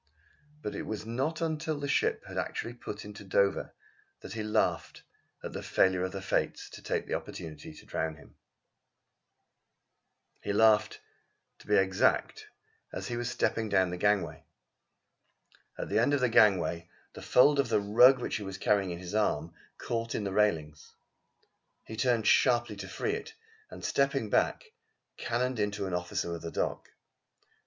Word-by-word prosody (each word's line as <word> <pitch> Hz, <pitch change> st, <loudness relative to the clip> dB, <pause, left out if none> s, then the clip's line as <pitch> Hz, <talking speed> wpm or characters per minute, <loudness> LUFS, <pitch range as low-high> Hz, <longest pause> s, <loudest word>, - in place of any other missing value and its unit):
But 105 Hz, -, -3 dB
it -, -, -5 dB
was 110 Hz, -1 st, -4 dB
not 135 Hz, +8 st, -2 dB
until 155 Hz, -2 st, -2 dB
the 140 Hz, -, -3 dB
ship 140 Hz, -, +1 dB
had -, -, -9 dB
actually 120 Hz, -, -3 dB
put 105 Hz, -4 st, -8 dB
into 105 Hz, 0 st, -9 dB
Dover 100 Hz, 0 st, +1 dB, 0.5 s
that 95 Hz, -, -8 dB
he 110 Hz, -, -4 dB
laughed 105 Hz, 0 st, -1 dB, 0.4 s
at -, -, -6 dB
the -, -, -5 dB
failure 95 Hz, -1 st, +2 dB
of 95 Hz, -, -2 dB
the 95 Hz, -1 st, -6 dB
Fates -, -, -1 dB
to -, -, -10 dB
take -, -, -2 dB
the -, -, -4 dB
opportunity 80 Hz, -1 st, -6 dB
to -, -, -14 dB
drown 80 Hz, -1 st, -3 dB
him. 70 Hz, -, -18 dB, 2.1 s
He 100 Hz, -, -2 dB
laughed, 110 Hz, 0 st, +4 dB, 0.6 s
to -, -, -17 dB
be 105 Hz, -, +3 dB
exact, 95 Hz, -1 st, +2 dB, 0.4 s
as -, -, -5 dB
he 120 Hz, -, -2 dB
was 120 Hz, 0 st, -2 dB
stepping 110 Hz, -2 st, 0 dB
down 95 Hz, -2 st, +2 dB
the 90 Hz, -, -4 dB
gangway. 105 Hz, 0 st, 0 dB, 1.3 s
At -, -, -4 dB
the -, -, +2 dB
end 145 Hz, -, +3 dB
of 140 Hz, -, -1 dB
the 125 Hz, -, +3 dB
gangway 95 Hz, -6 st, +3 dB, 0.2 s
the -, -, -10 dB
fold 140 Hz, +3 st, +5 dB
of 135 Hz, -4 st, +2 dB
the 110 Hz, -2 st, +3 dB
rug 120 Hz, +6 st, +6 dB
which -, -, -2 dB
he 105 Hz, -, -6 dB
was 95 Hz, 0 st, -6 dB
carrying 100 Hz, -2 st, +1 dB
on 85 Hz, -, -4 dB
his 90 Hz, +2 st, -8 dB
arm, 85 Hz, -7 st, 0 dB, 0.2 s
caught 115 Hz, -1 st, -3 dB
in 105 Hz, -, -2 dB
the 100 Hz, -1 st, -3 dB
railings. 80 Hz, -8 st, 0 dB, 0.9 s
He 110 Hz, -, -8 dB
turned 115 Hz, -1 st, +1 dB
sharply 120 Hz, -1 st, +3 dB
to 95 Hz, -1 st, -7 dB
free 95 Hz, -, -2 dB
it 450 Hz, 0 st, -6 dB, 0.3 s
and -, -, -8 dB
stepping 135 Hz, -6 st, +1 dB
back, -, -, +1 dB, 0.5 s
cannoned 125 Hz, +1 st, -1 dB
into 105 Hz, -1 st, -1 dB
an 95 Hz, -, -4 dB
officer 90 Hz, -1 st, -2 dB
of 85 Hz, -, -6 dB
the 85 Hz, -, -5 dB
dock. -, -, -3 dB
105 Hz, 170 wpm, -30 LUFS, 95-120 Hz, 2.1 s, rug